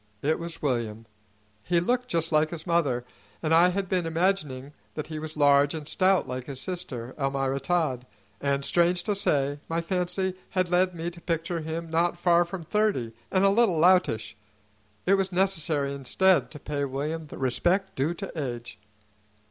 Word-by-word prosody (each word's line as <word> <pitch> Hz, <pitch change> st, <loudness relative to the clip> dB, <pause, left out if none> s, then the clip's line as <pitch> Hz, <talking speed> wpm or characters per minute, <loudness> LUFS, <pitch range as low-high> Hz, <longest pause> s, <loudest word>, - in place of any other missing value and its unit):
It 155 Hz, +3 st, +1 dB
was 170 Hz, -1 st, -7 dB
William. 115 Hz, -5 st, -1 dB, 0.6 s
He 170 Hz, +8 st, +1 dB
looked 250 Hz, +8 st, 0 dB
just 165 Hz, -7 st, 0 dB
like 155 Hz, 0 st, +3 dB
his 165 Hz, -1 st, -7 dB
mother, 145 Hz, -9 st, +1 dB, 0.4 s
and 160 Hz, 0 st, +2 dB
I 170 Hz, +2 st, +7 dB
had 190 Hz, +1 st, -2 dB
been 180 Hz, -2 st, 0 dB
imagining 155 Hz, -6 st, -1 dB, 0.2 s
that -, -, -3 dB
he 155 Hz, -1 st, -6 dB
was 155 Hz, 0 st, -7 dB
large 145 Hz, +1 st, +4 dB
and 150 Hz, -2 st, -6 dB
stout 185 Hz, 0 st, +2 dB
like 125 Hz, 0 st, -4 dB
his 135 Hz, -3 st, -6 dB
sister, 130 Hz, -9 st, -5 dB
Almira 135 Hz, 0 st, 0 dB
Todd; 135 Hz, -5 st, -1 dB, 0.3 s
and, 140 Hz, -1 st, 0 dB
strange 175 Hz, 0 st, +2 dB
to 210 Hz, -, 0 dB
say, 145 Hz, -7 st, 0 dB
my 165 Hz, +1 st, 0 dB
fancy 180 Hz, +2 st, -1 dB
had 185 Hz, -2 st, 0 dB
led 180 Hz, 0 st, +2 dB
me 170 Hz, +1 st, -3 dB
to 170 Hz, 0 st, -14 dB
picture 165 Hz, 0 st, -2 dB
him 160 Hz, +2 st, -4 dB
not 170 Hz, +2 st, +1 dB
far 175 Hz, 0 st, +4 dB
from 175 Hz, 0 st, -6 dB
thirty 195 Hz, -, 0 dB, 0.2 s
and 190 Hz, 0 st, +3 dB
a -, -, +6 dB
little 200 Hz, -4 st, +3 dB
loutish. 175 Hz, -10 st, +3 dB, 0.7 s
It 190 Hz, -, +4 dB
was 195 Hz, -1 st, +1 dB
necessary 160 Hz, -7 st, 0 dB
instead 175 Hz, +7 st, +2 dB
to 150 Hz, -, -10 dB
pay 145 Hz, -1 st, -3 dB
William 150 Hz, +4 st, -3 dB
the 150 Hz, -, -10 dB
respect 175 Hz, +9 st, 0 dB
due 150 Hz, +6 st, 0 dB
to 195 Hz, +2 st, -6 dB, 0.2 s
age. 115 Hz, -2 st, -12 dB
165 Hz, 175 wpm, -27 LUFS, 140-180 Hz, 0.7 s, I